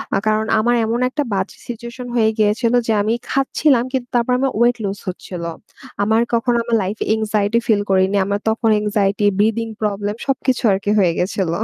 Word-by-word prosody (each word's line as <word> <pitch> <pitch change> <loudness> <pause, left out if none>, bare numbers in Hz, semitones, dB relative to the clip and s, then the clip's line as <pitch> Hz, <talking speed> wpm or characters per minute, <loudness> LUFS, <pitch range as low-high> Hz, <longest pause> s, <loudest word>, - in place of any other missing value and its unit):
আ - - +3
কারণ 215 0 +2
আমার 240 +2 +2
এমন 230 +2 -1
একটা 295 +3 -2
বাজে 195 0 -2
সিচুয়েশন 235 +1 -7
হয়ে 220 -2 +3
গিয়েছিল 215 +2 +1
যে, 225 - +2
আমি 215 +3 0 0.2
খাচ্ছিলাম 270 -1 +2
কিন্তু 255 -2 -2
তারপর 240 +1 +2
আমার 270 0 +1
ওয়েট 240 +1 +3
লুজ 200 0 -3
হচ্ছিল। 180 -1 -6 0.6
আমার 220 +2 +2
কখনো 235 +1 +2
আমার 235 -1 0
লাইফে 200 +4 -3
এনক্সাইটি 215 0 0
ফিল 210 -3 +3
করিনি। 190 +1 +2
আমার 200 +1 -1
তখন 225 +1 +1
এনক্সাইটি, 205 -1 0
ব্রিথিং 225 +2 +1
প্রবলেম 205 -1 -1 0.2
সবকিছু 260 -2 0
আর 190 - +2
কি 205 - 0
হয়ে 175 -3 +3
গেছিল। 185 -1 -1
220 Hz, 180 wpm, -19 LUFS, 200-235 Hz, 0.6 s, আ